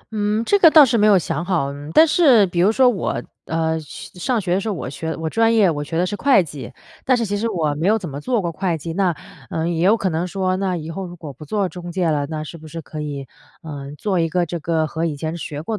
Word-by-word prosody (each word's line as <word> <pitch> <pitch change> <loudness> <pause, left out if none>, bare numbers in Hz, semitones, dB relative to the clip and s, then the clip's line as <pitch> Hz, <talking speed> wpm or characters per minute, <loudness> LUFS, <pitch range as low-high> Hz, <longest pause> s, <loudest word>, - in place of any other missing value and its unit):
嗯， 210 +2 0
这 405 - +3
个 335 - +8
倒 310 -2 +8
是 235 - 0
没 210 - +4
有 200 -2 +6
想 170 -1 -2
好。 165 -7 -1 0.2
但 320 - +6
是 265 - +5
比 175 -1 -3
如 195 +5 +4
说 255 +2 +4
我， 230 -6 -1 0.2
呃， 160 0 -1
上 180 - -4
学 180 -3 -1
的 195 - +1
时 220 - -3
候 205 - -2
我 130 - -5
学 160 +4 -4
我 160 -1 -4
专 225 +5 +2
业 195 -6 +4
我 145 -1 -3
学 165 +2 -4
的 180 - +2
是 205 - -3
会 260 -6 +4
计， 145 -3 -9 0.3
但 255 -1 +3
是 230 - -1
其 205 0 -2
实 225 +3 -1
我 160 -7 0
没 160 +6 -2
有 220 - +4
怎 185 -6 -6
么 140 0 -7
做 240 +6 0
过 170 -3 -2
会 175 -1 -2
计， 165 +2 -6
那， 190 -1 +2 0.4
呃， 160 +1 -2
也 170 0 -1
有 210 +5 +4
可 195 -3 -1
能 165 +2 -2
说 185 0 -1
那 190 -2 -1
以 160 0 -6
后 190 +2 -5
如 175 - -10
果 155 -5 -9
不 145 - -12
做 200 +3 -1
中 175 -1 -8
介 175 -1 0
了 145 -1 -1
那 155 -1 -4
是 165 +2 -9
不 155 - -12
是 165 +2 -7
可 155 0 -7
以， 140 -2 -5 0.4
呃， 140 -3 -7
做 190 -1 -1
一 165 -1 +1
个 175 +1 +1
这 170 +1 -5
个 160 0 0
和 160 +1 -4
以 155 -3 -2
前 160 +3 -4
学 150 -2 -6
过 220 - -3
175 Hz, 300 characters per minute, -20 LUFS, 160-205 Hz, 0.4 s, 个